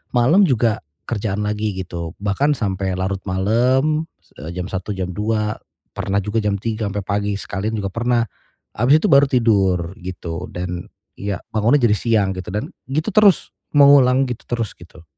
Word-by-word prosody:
Malem 165 +11 +5
juga 115 -4 +1 0.3
kerjaan 105 -2 -2
lagi 105 -1 -2
gitu. 85 -3 -6
Bahkan 120 +9 +1
sampai 95 -4 -2
larut 95 +1 -2
malem, 130 - +1 0.3
eee, 80 +4 -7
jam 90 -1 -3
1.00 95 +2 -3
jam 90 -1 -3
2.00, 105 +2 -1 0.3
pernah 100 0 -2
juga 105 +2 -1
jam 105 -2 0
3.00 110 +1 -3
sampai 100 0 -3
pagi 100 +1 -1
sekalian 105 +2 -3
juga 100 -2 -3
pernah, 120 +2 +1 0.5
abis 135 +7 +5
itu - - +3
baru 140 +1 +7
tidur, 95 -8 +2
gitu. 90 -1 -6
Dan 90 0 -5 0.3
iya, 100 -2 -3
bangunnya 110 +6 +3
jadi 105 -2 +4
siang 110 -5 +1
gitu 90 - -6
dan 145 - -3 0.2
gitu 155 +9 -1
terus, 210 -3 +4 0.2
mengulang 135 -2 +6
gitu 120 - -5
terus 115 -3 -2
gitu. 85 -1 -15
105 Hz, 160 wpm, -20 LUFS, 95-120 Hz, 0.5 s, baru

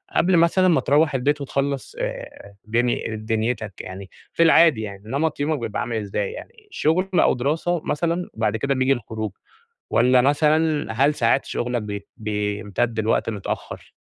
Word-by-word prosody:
قبل 180 0 +4
مثلًا 170 +3 +4
ما 170 -3 +3
ترَوّح 145 0 +2
البيت 145 +3 +1
وتخلَّص 140 - -2
آآ، - - -6
دن 120 +3 +1 0.3
دنيتَك، 110 -1 -1
يعني 95 +1 -9 0.2
في 165 - +3
العادي، 165 -6 +5
يعني 100 -2 -8
نمط 145 +7 -1
يومك 150 +1 0
بيبقى 115 -3 -3
عامل 120 -1 -3
إزاي؟ 100 -1 -2
يعني 460 -2 -12
شغل 185 - +1
أو - - +4
دراسة 160 +6 -1
مثلًا، 170 +3 -1
بعد 110 -1 0
كده 140 +5 0
بييجي 130 +1 +3
الخروج، 110 -4 -5 0.6
والّا 125 +1 +4
مثلًا 150 +1 +2
هل 140 +6 +2
ساعات 120 +1 +2
شغلَك 120 -1 -2
بي 100 -1 -6
بيمتدّ 105 +2 -2
لوقت 110 +1 +1
متأخّر؟ 105 -3 -6
130 Hz, 155 wpm, -22 LUFS, 110-160 Hz, 0.6 s, العادي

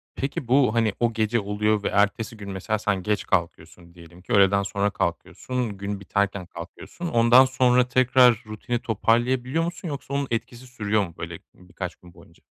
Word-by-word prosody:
Peki, 135 -1 -4
bu, 130 -2 +3
hani, 115 -3 +2
o 120 -1 +1
gece 110 +1 +1
oluyor 105 +1 0
ve - - 0
ertesi 105 +2 0
gün 100 -1 -8
mesela 105 +3 -2
sen 105 -3 -1
geç 105 0 -1
kalkıyorsun. 85 -1 -3
Diyelim 85 0 -15
ki 120 - -5
öğleden 100 -1 +4
sonra 100 +1 -1
kalkıyorsun, 105 +5 -3
gün 100 0 -4
biterken 100 -1 -1
kalkıyorsun. 85 - -9
Ondan 120 -1 +6
sonra 125 -1 +3
tekrar 125 -2 +4
rutini 110 +3 -4
toparlayabiliyor 125 +6 0
musun 170 +1 -5
yoksa 140 -2 -6
onun 140 0 -1
etkisi 120 +2 -4
sürüyor 105 -4 -1
mu, 85 - -15
böyle, - - -6 0.2
ııı, 90 0 -20
birkaç 90 -1 -6
gün 90 -1 -18
boyunca? - - -20
110 Hz, 175 wpm, -24 LUFS, 100-125 Hz, 0.2 s, Ondan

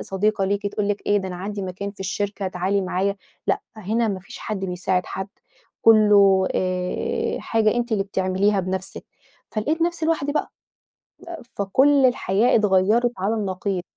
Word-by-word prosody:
صديقة 195 +1 0
ليكِ، 200 +1 -1
تقول 205 0 -2
لِك 205 0 -2
إيه 205 - +3
ده 190 -1 -4
أنا 180 - -6
عندي 200 +2 -5
مكان 190 +2 -5
في 200 - -18
الشركة 195 +1 -2
تعالي 185 +2 0
معايا، 190 +1 -1 0.3
لأ - - +1 0.2
هنا 220 +3 0
ما 190 -2 -3
فيش - - -11
حد 195 -3 -4
بيساعد 180 0 -1
حد، 190 +1 -5 0.5
كله 205 -4 +6
آآ 185 - -1
حاجة 220 -2 +1
أنتِ 240 -1 -1
اللي 200 -2 +2
بتعمليها 195 +1 +1
بنفسِك، 185 +1 -5 0.5
فلقيت 300 +10 -1
نفسي 340 -1 0
لوحدي 290 -3 0
بقى. 300 - -1 1.1
فكل 265 +8 +4
الحياة 235 -2 +2
اتغيّرِت 210 +3 +3
على 200 +4 0
النقيض. 190 -2 -2
200 Hz, 155 wpm, -23 LUFS, 190-220 Hz, 1.1 s, كله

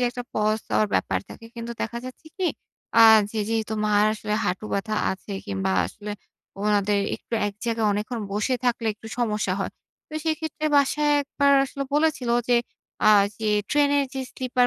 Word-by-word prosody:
যে, 250 - +2
একটা 245 0 -6
পস 215 0 +1
দেওয়ার 105 -1 +2
ব্যাপার 95 0 +1
থাকে 230 - -11
কিন্তু 235 0 -5
দেখা 235 +2 -3
যাচ্ছে 255 +5 -10
কি? 375 - 0 0.5
আ - - +8 0.3
যে 225 - -4
যেহেতু 220 -1 -1
মার 210 0 +4
আসলে 210 -1 -3
হাঁটু 180 +4 -2
ব্যাথা 215 +2 -1 0.2
আছে 190 +2 -6
কিংবা 95 -1 -1
আসলে 205 - -8 0.5
ওনাদের 205 -1 +2 0.2
একটু - - -7
এক 205 - -4
জায়গায় 230 -2 0
অনেকক্ষণ 215 +3 -3
বসে 210 +5 0
থাকলে 235 -2 0
একটু 220 +1 -13
সমস্যা 210 -5 0
হয়। - - -2 0.4
তো - - -18
সেক্ষেত্রে 315 -1 -2
বাসায় 295 +1 +3
১ 285 - -6
বার 280 0 +5
আসলে 275 +1 -5
বলেছিলো 295 -6 +2
যে 245 - +5 0.5
আ - - +8 0.3
যে, 220 -1 -1 0.2
ট্রেনের 285 -1 +3
যে 265 - -2
স্লিপার 250 -1 +1
225 Hz, 175 wpm, -24 LUFS, 210-265 Hz, 0.5 s, আ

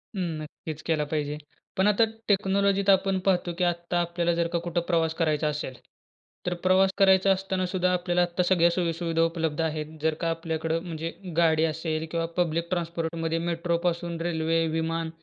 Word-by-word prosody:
हं, 190 - -2 0.2
नक्कीच 155 0 -8
केला 155 -2 +1
पाहिजे. 150 -1 -1 0.4
पण 190 +2 +3
आता 210 +2 +4 0.2
टेक्नॉलॉजीत 200 0 +2
आपण 190 0 +4
पाहतो 180 -2 +1
की 180 - 0
आत्ता 175 0 0
आपल्याला 170 0 0
जर 170 0 +1
का 170 - +2
कुठं 175 0 0
प्रवास 165 -2 +1
करायचा 155 -2 +1
असेल, 150 -3 -3 0.7
तर 180 - 0
प्रवास 185 +1 +4
करायचा 195 -1 +5
असताना 190 -1 0
सुद्धा 180 0 0
आपल्याला 175 0 +1
आत्ता 175 +1 +1
सगळ्या 175 -2 +4
सोयीसुविधा 165 -1 0
उपलब्ध 165 -2 -1
आहेत. 155 0 -3
जर 160 0 +2
का 165 - +1
आपल्याकडं 165 0 -2
म्हणजे 165 -1 -4 0.3
गाडी 160 -2 +4
असेल 160 0 -2
किंवा 165 -1 0
पब्लिक 170 -1 0
ट्रान्सपोर्टमध्ये, 165 -2 -2
मेट्रोपासून 170 0 -1
रेल्वे, 165 -1 +1
विमान 165 0 -1
170 Hz, 160 wpm, -26 LUFS, 160-180 Hz, 0.7 s, करायचा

